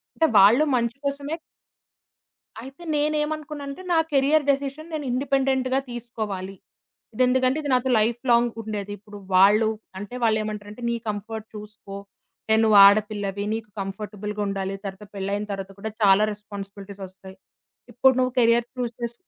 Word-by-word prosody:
అంటే 320 Hz, -, +3 dB
వాళ్ళు 220 Hz, +9 st, +7 dB
మంచి 235 Hz, +1 st, -1 dB
కోసమే 280 Hz, +2 st, -2 dB, 1.3 s
అయితే 270 Hz, +6 st, -12 dB
నేనేమనుకున్నాంటే, 300 Hz, 0 st, -2 dB
నా 330 Hz, -, +4 dB
కెరియర్ 285 Hz, +2 st, +3 dB
డెసిషన్ 280 Hz, +4 st, -2 dB
నేను 300 Hz, -3 st, -3 dB
ఇండిపెండెంట్‌గా 265 Hz, 0 st, +1 dB
తీసుకోవాలి. 215 Hz, -5 st, -5 dB, 0.6 s
ఇది 255 Hz, -, +1 dB
ఎందుకంటే, 260 Hz, +3 st, +2 dB
ఇది 285 Hz, -, -3 dB
నాతో 255 Hz, +1 st, +1 dB
లైఫ్ 230 Hz, +2 st, 0 dB
లాంగ్ 235 Hz, 0 st, +4 dB
ఉండేది. 205 Hz, -2 st, -5 dB
ఇప్పుడు 205 Hz, 0 st, -12 dB, 0.2 s
వాళ్ళు, 205 Hz, +4 st, +6 dB, 0.3 s
అంటే 205 Hz, +5 st, -8 dB
వాళ్ళు 220 Hz, -2 st, +3 dB
ఏమంటారంటే, 210 Hz, +1 st, -7 dB
"నీ 235 Hz, -, 0 dB
కంఫర్ట్ 215 Hz, +1 st, -5 dB
చూసుకో. 210 Hz, -1 st, -10 dB, 0.5 s
అంటే 220 Hz, -, +4 dB
నువ్వు 215 Hz, -2 st, +6 dB
ఆడపిల్లవి 205 Hz, -1 st, +1 dB
నీకు 220 Hz, -1 st, -5 dB
కంఫర్టబుల్‌గుండాలి. 200 Hz, -1 st, -4 dB
తర్వాత 195 Hz, +1 st, -7 dB
పెళ్లైనా 200 Hz, +2 st, -2 dB
తర్వాత 195 Hz, 0 st, -5 dB
కూడా 220 Hz, +2 st, -5 dB
చాలా 200 Hz, +1 st, +6 dB
రెస్పాన్సిబిలిటీసొస్తాయి. 195 Hz, -2 st, -10 dB, 0.6 s
ఇప్పుడు 260 Hz, +3 st, +4 dB
నువ్వు 255 Hz, 0 st, +1 dB
కెరియర్ 235 Hz, 0 st, +4 dB
చూజ్ 245 Hz, -2 st, -3 dB
చేసు" 235 Hz, 0 st, -2 dB
220 Hz, 135 wpm, -24 LUFS, 205-260 Hz, 1.3 s, వాళ్ళు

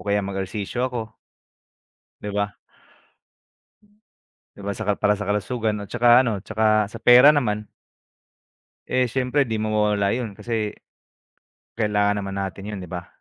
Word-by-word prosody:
kaya 100 Hz, 0 st, +1 dB
mag 95 Hz, 0 st, -4 dB
ehersisyo 105 Hz, +6 st, -3 dB
ako. 110 Hz, -3 st, -6 dB, 1.1 s
Di 105 Hz, -, -5 dB
ba? 100 Hz, 0 st, -2 dB, 2.0 s
Di -, -, -10 dB
ba 100 Hz, -, -4 dB
sa 110 Hz, -, -5 dB
kal 105 Hz, -1 st, 0 dB
para 105 Hz, 0 st, +3 dB
sa 105 Hz, -, -5 dB
kalusugan 105 Hz, +1 st, -1 dB
at 100 Hz, -, -9 dB
tsaka 120 Hz, 0 st, +1 dB
ano, 115 Hz, -5 st, -1 dB
tsaka 110 Hz, -1 st, +2 dB
sa 110 Hz, +2 st, -10 dB
pera 125 Hz, +5 st, +8 dB
naman. 105 Hz, -7 st, 0 dB, 1.2 s
Eh, 130 Hz, -1 st, +1 dB
siyempre 130 Hz, +3 st, 0 dB
di 110 Hz, -, -2 dB
mawawala 105 Hz, -2 st, +1 dB
yun. 115 Hz, -4 st, -4 dB
Kasi, 110 Hz, -2 st, -3 dB, 1.0 s
kailangan 105 Hz, -1 st, +1 dB
naman 100 Hz, -1 st, -5 dB
natin 95 Hz, +1 st, -5 dB
yun, 105 Hz, -2 st, -5 dB
di 90 Hz, -, -10 dB
ba? 90 Hz, -1 st, -6 dB
105 Hz, 145 wpm, -23 LUFS, 100-115 Hz, 2.0 s, pera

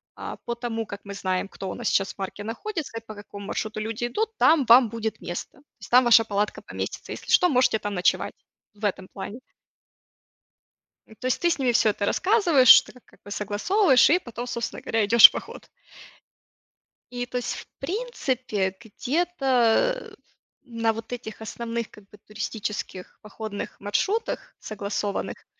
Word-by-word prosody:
а, -, -, -7 dB
по 235 Hz, -, -2 dB
тому, 230 Hz, -2 st, -4 dB
как 200 Hz, -1 st, -8 dB
мы 200 Hz, -, -7 dB
знаем, 185 Hz, -1 st, -2 dB
кто 195 Hz, -1 st, -7 dB
у -, -, -4 dB
нас 240 Hz, -, -4 dB
сейчас 195 Hz, 0 st, +1 dB
в -, -, -18 dB
парке 195 Hz, +1 st, -6 dB
находится 285 Hz, -, -5 dB
и -, -, -5 dB
по 215 Hz, -, -9 dB
какому 200 Hz, 0 st, -10 dB
маршруту 215 Hz, 0 st, -3 dB
люди 225 Hz, +2 st, -3 dB
идут, 440 Hz, -, -2 dB
там 310 Hz, -4 st, +4 dB
вам 235 Hz, 0 st, +7 dB
будет 225 Hz, 0 st, -4 dB
место. 175 Hz, +9 st, -7 dB, 0.2 s
С -, -, -10 dB
там 250 Hz, +1 st, +6 dB
ваша 230 Hz, -2 st, +6 dB
палатка 205 Hz, 0 st, -2 dB
поместится. -, -, -6 dB
Если -, -, -7 dB
что, 360 Hz, -, +6 dB
можете 250 Hz, -7 st, +2 dB
там 205 Hz, -1 st, -4 dB
ночевать". 180 Hz, -1 st, +1 dB, 0.4 s
В 210 Hz, -, -20 dB
этом 190 Hz, -2 st, -1 dB
плане. 200 Hz, +5 st, -8 dB, 1.7 s
М, 220 Hz, -, -16 dB
то -, -, -8 dB
есть 255 Hz, -, 0 dB
ты 345 Hz, -, +3 dB
с -, -, 0 dB
ними 255 Hz, -2 st, +2 dB
всё 225 Hz, -2 st, +3 dB
это 205 Hz, -1 st, -1 dB
рассказываешь, 355 Hz, -, +3 dB
что -, -, 0 dB
как- 250 Hz, -, -19 dB
как -, -, -23 dB
бы 205 Hz, -, -11 dB
согласовываешь 260 Hz, -, +3 dB
и 360 Hz, -, +3 dB
потом, 240 Hz, -5 st, -7 dB
собственно 235 Hz, -1 st, -4 dB
говоря, 225 Hz, -1 st, 0 dB
идешь 230 Hz, +2 st, +10 dB
в -, -, -17 dB
поход. -, -, -8 dB, 1.4 s
И 245 Hz, 0 st, -3 dB
то 250 Hz, 0 st, -5 dB
есть 245 Hz, -, -3 dB
в -, -, -10 dB
принципе, 255 Hz, -, -2 dB
где-то, 270 Hz, -, +1 dB
э, -, -, -10 dB, 0.5 s
на 230 Hz, -3 st, -1 dB
вот 225 Hz, +2 st, -7 dB
этих 225 Hz, -3 st, -8 dB
основных 230 Hz, +1 st, -4 dB
как 205 Hz, -1 st, -18 dB
бы 210 Hz, -, -16 dB
туристических 210 Hz, -3 st, -6 dB
походных 210 Hz, -1 st, -7 dB
маршрутах, 295 Hz, -, -2 dB
согласованных, 205 Hz, -1 st, -4 dB
230 Hz, 175 wpm, -25 LUFS, 205-255 Hz, 1.7 s, идешь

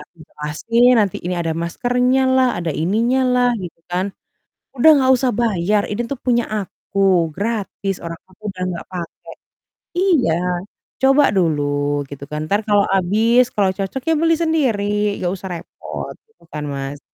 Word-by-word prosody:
aku -, -, -51 dB
jelasin 230 Hz, +12 st, +1 dB
nanti 200 Hz, -4 st, 0 dB
ini 180 Hz, -, -2 dB
ada 165 Hz, -1 st, -1 dB
maskernyalah, 250 Hz, +6 st, +1 dB
ada 170 Hz, -, -3 dB
ininyalah 245 Hz, -, +2 dB
gitu 175 Hz, -3 st, -8 dB
kan. 185 Hz, +3 st, -2 dB, 0.6 s
"Udah 295 Hz, +5 st, +7 dB
nggak 260 Hz, 0 st, +4 dB
usah 250 Hz, 0 st, +1 dB
bayar, 205 Hz, -2 st, +1 dB
ini 220 Hz, +3 st, -2 dB
tuh 275 Hz, +1 st, -5 dB
punya 240 Hz, -2 st, +1 dB
aku, 195 Hz, -4 st, 0 dB
gratis, 200 Hz, -2 st, -3 dB
orang 165 Hz, 0 st, -6 dB
aku 210 Hz, +3 st, -10 dB
udah 180 Hz, -1 st, -5 dB
nggak 170 Hz, -, -6 dB
pake. 175 Hz, -2 st, -7 dB, 0.7 s
Iya, 285 Hz, -, +2 dB, 0.6 s
coba 270 Hz, +2 st, +5 dB
dulu, 145 Hz, -4 st, +1 dB
gitu 140 Hz, 0 st, -9 dB
kan, 150 Hz, 0 st, -3 dB
entar 205 Hz, +2 st, +2 dB
kalau 205 Hz, -1 st, +4 dB
habis, 220 Hz, +7 st, +3 dB
kalau 195 Hz, -2 st, +2 dB
cocok, 195 Hz, +6 st, -3 dB
ya 325 Hz, -, +4 dB
beli 330 Hz, 0 st, +3 dB
sendiri 270 Hz, -12 st, +1 dB, 0.3 s
nggak 175 Hz, -, 0 dB
usah 190 Hz, 0 st, -7 dB
repot." -, -, -8 dB
Gitu 445 Hz, -, -29 dB
kan, 150 Hz, 0 st, -4 dB
Mas. 140 Hz, +1 st, -5 dB
205 Hz, 150 wpm, -19 LUFS, 170-250 Hz, 0.7 s, Udah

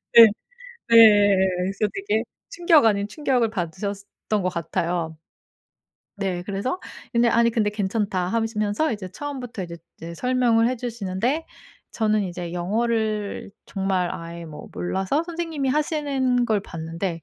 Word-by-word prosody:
네. 230 Hz, -1 st, +11 dB, 0.6 s
네. 210 Hz, -3 st, +7 dB, 0.2 s
그래서 195 Hz, +3 st, 0 dB
되게 395 Hz, +2 st, -1 dB, 0.3 s
충격 340 Hz, -, +4 dB
아닌 200 Hz, -2 st, +2 dB
충격을 250 Hz, -3 st, 0 dB
받으셨던 200 Hz, +2 st, -4 dB
것 185 Hz, -, +1 dB
같아요. 170 Hz, 0 st, -2 dB, 1.0 s
네. 190 Hz, -3 st, -2 dB
그래서 205 Hz, -, -3 dB, 0.3 s
근데 235 Hz, -1 st, +4 dB
아니 235 Hz, 0 st, +4 dB
근데 220 Hz, -2 st, +1 dB
"괜찮다." 200 Hz, -2 st, -1 dB
하시면서 225 Hz, +4 st, 0 dB
이제 205 Hz, -4 st, -5 dB
처음부터 255 Hz, -5 st, -6 dB
이제 170 Hz, -1 st, -8 dB, 0.2 s
이제 170 Hz, +1 st, -7 dB
설명을 240 Hz, 0 st, +2 dB
해 255 Hz, -, 0 dB
주시는데 235 Hz, -, -2 dB, 0.5 s
저는 215 Hz, -1 st, +1 dB
이제 175 Hz, -1 st, -5 dB
영어를 215 Hz, +2 st, -1 dB, 0.2 s
정말 190 Hz, -2 st, -1 dB
아예 170 Hz, 0 st, -7 dB
뭐 150 Hz, -2 st, -9 dB
몰라서 190 Hz, -, -1 dB
선생님이 330 Hz, -5 st, -3 dB
하시는 275 Hz, -4 st, +1 dB
걸 215 Hz, -3 st, +1 dB
봤는데 165 Hz, 0 st, -5 dB
215 Hz, 290 characters per minute, -24 LUFS, 185-245 Hz, 1.0 s, 네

